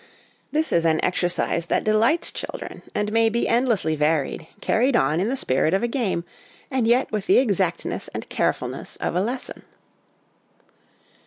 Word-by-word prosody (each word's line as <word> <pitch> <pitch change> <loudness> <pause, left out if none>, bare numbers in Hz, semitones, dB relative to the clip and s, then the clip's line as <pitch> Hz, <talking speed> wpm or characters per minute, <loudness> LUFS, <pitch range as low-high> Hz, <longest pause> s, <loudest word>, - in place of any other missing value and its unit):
This 315 +1 0
is 170 - +3
an 160 -1 +2
exercise 175 -1 0
that - - +1
delights 225 +10 +2
children, - - -6
and 210 0 0
may 225 0 +4
be 235 +2 0
endlessly 230 -10 +2
varied, 155 +1 0
carried 245 +5 +2
on 150 0 +2
in 200 +5 0
the 270 - -1
spirit 155 - +1
of 195 - 0
a - - +2
game, 225 -9 -1 0.5
and 260 -4 +1
yet 245 +3 +3
with 210 -3 -3
the - - +5
exactness 195 -8 0
and - - -7
carefulness - - -2
of - - -3
a 180 - +2
lesson. 245 +5 -4
210 Hz, 160 wpm, -23 LUFS, 170-240 Hz, 0.5 s, the